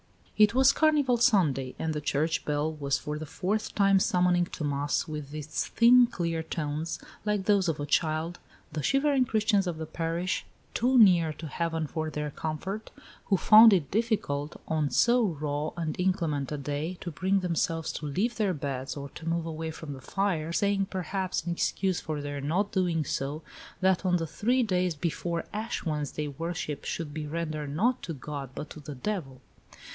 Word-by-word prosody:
It 210 Hz, +1 st, +5 dB
was 265 Hz, +1 st, +6 dB
Carnival 290 Hz, -5 st, +3 dB
Sunday, 155 Hz, -, +2 dB
and 160 Hz, -1 st, -2 dB
the 150 Hz, -, -3 dB
church 150 Hz, +2 st, 0 dB
bell 150 Hz, +1 st, 0 dB
was 140 Hz, -3 st, -1 dB
for 150 Hz, 0 st, -5 dB
the 155 Hz, -, -6 dB
fourth 205 Hz, +7 st, -2 dB
time 195 Hz, -1 st, +5 dB
summoning 180 Hz, -1 st, +3 dB
to 165 Hz, -, -6 dB
mass 145 Hz, 0 st, 0 dB
with 150 Hz, -2 st, -6 dB
its 150 Hz, 0 st, -3 dB
thin, 245 Hz, +1 st, +6 dB
clear 170 Hz, -7 st, -2 dB
tones, 160 Hz, 0 st, -3 dB, 0.3 s
like 210 Hz, -2 st, 0 dB
those 200 Hz, -4 st, +3 dB
of 155 Hz, -, -2 dB
a 145 Hz, -, -2 dB
child, 160 Hz, +3 st, 0 dB, 0.3 s
the 150 Hz, 0 st, -3 dB
shivering 275 Hz, -, +2 dB
Christians 210 Hz, -4 st, +2 dB
of 170 Hz, -3 st, -2 dB
this 160 Hz, 0 st, -5 dB
parish 170 Hz, +2 st, -1 dB, 0.3 s
(too 255 Hz, +3 st, +2 dB
near 175 Hz, -8 st, +6 dB
to 160 Hz, -, -9 dB
heaven 165 Hz, +1 st, -2 dB
for 155 Hz, +1 st, -3 dB
their 150 Hz, -1 st, -3 dB
comfort), 190 Hz, +9 st, -4 dB, 0.4 s
who 195 Hz, -, +2 dB
found 220 Hz, +3 st, +8 dB
it 165 Hz, -8 st, +1 dB
difficult, 195 Hz, -10 st, -1 dB
on 155 Hz, -2 st, 0 dB
so 240 Hz, -, +4 dB
raw 150 Hz, -5 st, -1 dB
and 160 Hz, -2 st, -2 dB
inclement 165 Hz, -7 st, 0 dB
a 150 Hz, -, -2 dB
day, 145 Hz, +5 st, -3 dB
to 175 Hz, -, -5 dB
bring 190 Hz, +5 st, +1 dB
themselves 165 Hz, -2 st, -1 dB
to 150 Hz, -, -5 dB
leave 200 Hz, -, -1 dB
their 200 Hz, -5 st, +1 dB
beds 135 Hz, -1 st, -4 dB
or 140 Hz, 0 st, -6 dB
to 165 Hz, +4 st, -6 dB
move 165 Hz, 0 st, -1 dB
away 160 Hz, 0 st, -4 dB
from 160 Hz, -2 st, -7 dB
the 135 Hz, -, -10 dB
fire, 175 Hz, -2 st, -1 dB
saying, 200 Hz, +2 st, +1 dB
perhaps, 185 Hz, -1 st, -2 dB
in 175 Hz, -, -1 dB
excuse 185 Hz, +1 st, 0 dB
for 155 Hz, -2 st, -4 dB
their 145 Hz, -1 st, -4 dB
not 180 Hz, +9 st, 0 dB
doing 175 Hz, -5 st, +1 dB
so, 145 Hz, +4 st, -3 dB, 0.4 s
that 190 Hz, 0 st, +3 dB
on 180 Hz, -1 st, +2 dB
the 165 Hz, -, -2 dB
three 240 Hz, +11 st, +1 dB
days 180 Hz, -5 st, 0 dB
before 170 Hz, +2 st, -2 dB
Ash 215 Hz, +1 st, -3 dB
Wednesday 150 Hz, -1 st, -2 dB
worship 155 Hz, 0 st, -4 dB
should 155 Hz, -3 st, -4 dB
be 155 Hz, -1 st, -4 dB
rendered 155 Hz, -2 st, -3 dB
not 245 Hz, +8 st, +2 dB
to 165 Hz, -, -5 dB
God, 140 Hz, 0 st, -6 dB
but 150 Hz, -, -6 dB
to -, -, -9 dB
the 145 Hz, -1 st, -8 dB
devil. 135 Hz, -4 st, -4 dB
165 Hz, 185 wpm, -28 LUFS, 150-195 Hz, 0.4 s, found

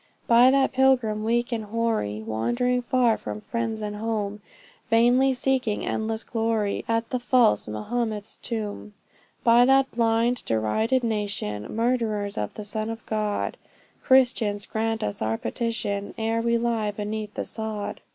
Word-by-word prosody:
By 240 Hz, +2 st, +6 dB
that 270 Hz, 0 st, +3 dB
pilgrim, 255 Hz, -5 st, +2 dB
weak 240 Hz, +2 st, 0 dB
and 225 Hz, -2 st, -2 dB
hoary, 210 Hz, -, -1 dB
Wandering 240 Hz, -, 0 dB
far 245 Hz, -2 st, +2 dB
from 105 Hz, 0 st, -5 dB
friends 225 Hz, -, -3 dB
and 210 Hz, 0 st, -4 dB
home 210 Hz, -2 st, -3 dB, 0.5 s
Vainly 245 Hz, +4 st, +4 dB
seeking 255 Hz, -4 st, 0 dB
endless 220 Hz, 0 st, -2 dB
glory 225 Hz, -3 st, -1 dB
At 230 Hz, 0 st, -1 dB
the 255 Hz, -, 0 dB
false 245 Hz, -, +3 dB
Mahomet's 215 Hz, -, -3 dB
tomb; 210 Hz, -2 st, -5 dB, 0.5 s
By 235 Hz, +1 st, +6 dB
that 270 Hz, +1 st, +4 dB
blind, 230 Hz, +1 st, +1 dB
derided 220 Hz, -, +1 dB
nation, 205 Hz, -, -2 dB
Murderers 225 Hz, -4 st, 0 dB
of 105 Hz, -, -4 dB
the 210 Hz, -, -6 dB
Son 215 Hz, +1 st, -3 dB
of 225 Hz, 0 st, -7 dB
God, 215 Hz, -1 st, -2 dB, 0.4 s
Christians, 240 Hz, -6 st, +3 dB
grant 225 Hz, 0 st, -2 dB
us 105 Hz, -, -3 dB
our 110 Hz, +1 st, 0 dB
petition, 205 Hz, -, -3 dB
Ere 225 Hz, +1 st, 0 dB
we 235 Hz, 0 st, +2 dB
lie 230 Hz, -2 st, 0 dB
beneath 210 Hz, +1 st, -5 dB
the -, -, -3 dB
sod! 220 Hz, -2 st, -5 dB
225 Hz, 140 wpm, -25 LUFS, 210-240 Hz, 0.5 s, By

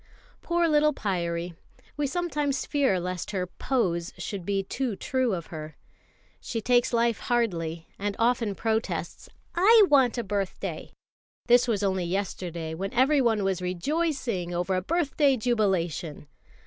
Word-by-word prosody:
Poor 345 Hz, 0 st, +1 dB
little 300 Hz, -1 st, +3 dB
Pyârie; 175 Hz, -4 st, -2 dB, 0.4 s
we 295 Hz, -1 st, 0 dB
sometimes 295 Hz, -3 st, -1 dB
fear 275 Hz, -11 st, +2 dB
lest 180 Hz, 0 st, -4 dB
her 190 Hz, -3 st, -1 dB
"pose" 180 Hz, -4 st, -1 dB
should 195 Hz, -5 st, -5 dB
be 195 Hz, -1 st, 0 dB
too 240 Hz, +3 st, -2 dB
true 255 Hz, 0 st, 0 dB
of 170 Hz, -2 st, -6 dB
her. 155 Hz, -1 st, -7 dB, 0.6 s
She 230 Hz, -, -4 dB
takes 245 Hz, +2 st, +2 dB
life 235 Hz, -1 st, +2 dB
hardly, 170 Hz, -9 st, -1 dB
and 205 Hz, 0 st, -2 dB
often 230 Hz, -3 st, +1 dB
protests. 225 Hz, +1 st, -2 dB, 0.2 s
"I 425 Hz, +5 st, +7 dB
want 260 Hz, -4 st, +4 dB
a 235 Hz, -, -1 dB
birthday!" 200 Hz, -2 st, -4 dB, 0.5 s
this 245 Hz, 0 st, +5 dB
was 210 Hz, -4 st, 0 dB
only 190 Hz, -2 st, 0 dB
yesterday, 175 Hz, -3 st, -3 dB
when 195 Hz, +4 st, -4 dB
everyone 250 Hz, -5 st, +3 dB
was 190 Hz, -2 st, 0 dB
rejoicing 200 Hz, -, -1 dB
over 180 Hz, +2 st, 0 dB
a 185 Hz, -, +1 dB
birthday 290 Hz, -, +2 dB
jubilation. 190 Hz, -10 st, -1 dB
210 Hz, 135 wpm, -27 LUFS, 180-260 Hz, 0.6 s, I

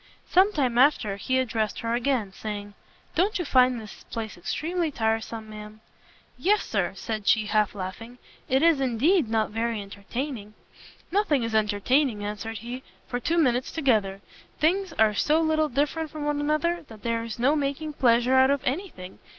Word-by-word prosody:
Sometime 295 Hz, -, +3 dB
after 250 Hz, -7 st, +3 dB
he 260 Hz, +6 st, 0 dB
addressed 225 Hz, -4 st, -1 dB
her 230 Hz, 0 st, -1 dB
again, 240 Hz, -5 st, 0 dB
saying, 205 Hz, 0 st, -6 dB, 0.4 s
"Don't 390 Hz, +5 st, +1 dB
you 355 Hz, -, -3 dB
find 255 Hz, -3 st, +4 dB
this 215 Hz, -2 st, -11 dB
place 225 Hz, -2 st, -5 dB
extremely 330 Hz, -, -2 dB
tiresome, 225 Hz, -3 st, -2 dB
ma'am?" 210 Hz, 0 st, -10 dB, 0.6 s
"Yes, 415 Hz, +3 st, +2 dB
Sir," 190 Hz, -4 st, -1 dB
said 215 Hz, 0 st, -5 dB
she, 215 Hz, -1 st, +4 dB
half 210 Hz, -1 st, +1 dB
laughing, 205 Hz, +6 st, -7 dB, 0.3 s
"it 265 Hz, +3 st, +3 dB
is, 330 Hz, -4 st, +4 dB
indeed, 270 Hz, -, +2 dB
not 220 Hz, -1 st, 0 dB
very 225 Hz, 0 st, -1 dB
entertaining!" 210 Hz, +3 st, -6 dB, 0.6 s
"Nothing 345 Hz, -, +2 dB
is 230 Hz, -1 st, -3 dB
entertaining," 220 Hz, +3 st, +1 dB
answered 215 Hz, +2 st, -5 dB
he, 240 Hz, +5 st, -6 dB, 0.3 s
"for 245 Hz, -, -3 dB
two 325 Hz, +7 st, 0 dB
minutes 255 Hz, -6 st, +2 dB
together. 215 Hz, -10 st, +1 dB, 0.4 s
Things 365 Hz, +4 st, +1 dB
are 220 Hz, -6 st, +3 dB
so 305 Hz, +9 st, +2 dB
little 315 Hz, -1 st, +1 dB
different 295 Hz, +4 st, -1 dB
one 300 Hz, -, -4 dB
from 295 Hz, 0 st, 0 dB
another, 305 Hz, +3 st, 0 dB
that 220 Hz, -2 st, -13 dB
there 230 Hz, -1 st, -1 dB
is 230 Hz, -1 st, -6 dB
no 265 Hz, +6 st, +3 dB
making 295 Hz, +1 st, -2 dB
pleasure 245 Hz, -1 st, +3 dB
out 260 Hz, 0 st, +6 dB
of 280 Hz, -1 st, +1 dB
any 355 Hz, +10 st, -1 dB
thing. 185 Hz, -, -11 dB
245 Hz, 165 wpm, -26 LUFS, 215-295 Hz, 0.6 s, out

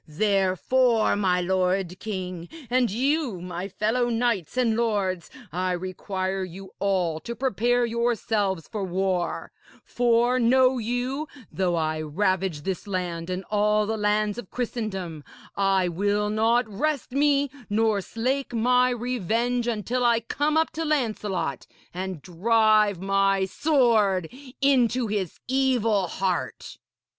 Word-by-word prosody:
Therefore, 205 Hz, +7 st, +2 dB
my 185 Hz, -3 st, +1 dB
lord 185 Hz, 0 st, 0 dB
king, 185 Hz, -5 st, -5 dB, 0.2 s
and 250 Hz, -1 st, +3 dB
you, 260 Hz, -, 0 dB
my 180 Hz, +1 st, -5 dB
fellow 225 Hz, +5 st, 0 dB
knights 230 Hz, -5 st, -1 dB
and 235 Hz, -3 st, +2 dB
lords, 200 Hz, -7 st, -1 dB, 0.2 s
I 180 Hz, +2 st, -1 dB
require 185 Hz, +1 st, -3 dB
you 185 Hz, +1 st, -9 dB
all 180 Hz, -5 st, 0 dB
to 235 Hz, +8 st, -6 dB
prepare 245 Hz, 0 st, +1 dB
yourselves 220 Hz, -6 st, -1 dB
for 210 Hz, -3 st, -4 dB
war; 185 Hz, -1 st, -1 dB, 0.3 s
for, 240 Hz, +1 st, +2 dB
know 255 Hz, +1 st, +4 dB
you, 245 Hz, +6 st, -2 dB, 0.2 s
though 180 Hz, -2 st, 0 dB
I 155 Hz, -1 st, -1 dB
ravage 185 Hz, 0 st, -1 dB
this 190 Hz, +5 st, -4 dB
land 180 Hz, -3 st, -3 dB
and 185 Hz, +1 st, -3 dB
all 210 Hz, 0 st, +2 dB
the 220 Hz, +1 st, -1 dB
lands 210 Hz, +1 st, 0 dB
of 220 Hz, -, -9 dB
Christendom, 195 Hz, -10 st, -4 dB, 0.3 s
I 195 Hz, -2 st, +2 dB
will 205 Hz, +4 st, 0 dB
not 230 Hz, +3 st, +2 dB
rest 275 Hz, +7 st, -2 dB
me 285 Hz, 0 st, +2 dB, 0.2 s
nor 215 Hz, -1 st, +2 dB
slake 255 Hz, +5 st, -2 dB
my 250 Hz, +2 st, +3 dB
revenge 245 Hz, 0 st, -1 dB
until 240 Hz, +2 st, -1 dB
I 235 Hz, -1 st, +3 dB
come 295 Hz, +6 st, 0 dB
up 320 Hz, -, +2 dB
to 325 Hz, -, -3 dB
Lancelot 215 Hz, -, -1 dB, 0.3 s
and 185 Hz, -4 st, -5 dB
drive 215 Hz, +2 st, +3 dB
my 195 Hz, 0 st, +2 dB
sword 215 Hz, -, +2 dB, 0.3 s
into 255 Hz, -3 st, +3 dB
his 205 Hz, -5 st, -3 dB
evil 240 Hz, -7 st, +2 dB
heart.' 185 Hz, -1 st, -3 dB
210 Hz, 125 wpm, -25 LUFS, 185-240 Hz, 0.3 s, know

